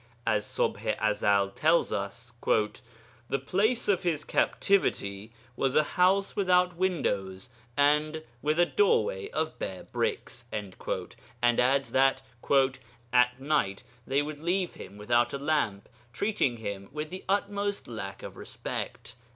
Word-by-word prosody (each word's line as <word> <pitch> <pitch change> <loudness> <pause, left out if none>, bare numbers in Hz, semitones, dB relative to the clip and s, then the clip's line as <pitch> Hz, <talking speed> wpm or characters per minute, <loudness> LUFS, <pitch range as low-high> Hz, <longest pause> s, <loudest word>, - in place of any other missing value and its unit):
As 110 -2 +1
Ṣubḥ - - -1
i 110 - +3
Ezel 100 -1 +2
tells 160 +2 +3
us, 115 +5 -4
'The 115 +3 -2
place 215 - +1
of 200 -3 +3
his 165 -5 0
captivity 110 - +1 0.2
was 135 +1 0
a 155 - +6
house 190 +4 +2
without 180 -2 +3
windows 100 - -1 0.3
and 150 +2 +2 0.2
with 155 +2 +1
a 175 - +6
doorway 460 - +2
of - - -2
bare - - -4
bricks,' 410 - -3
and 100 -3 -5 0.8
adds 135 +2 +2
that 135 0 +3 0.9
'at 125 0 +4
night 135 -8 0 0.2
they 140 +2 +2
would 150 0 -6
leave 175 +3 0
him 100 - -10
without 120 +3 +2
a - - -1
lamp, 140 -9 0 0.2
treating 140 - 0
him 100 -3 -6
with 150 +2 -5
the 185 - -7
utmost 205 0 -1
lack 100 -4 -6
of - - -8
respect.' - - -6
145 Hz, 135 wpm, -29 LUFS, 110-180 Hz, 0.9 s, a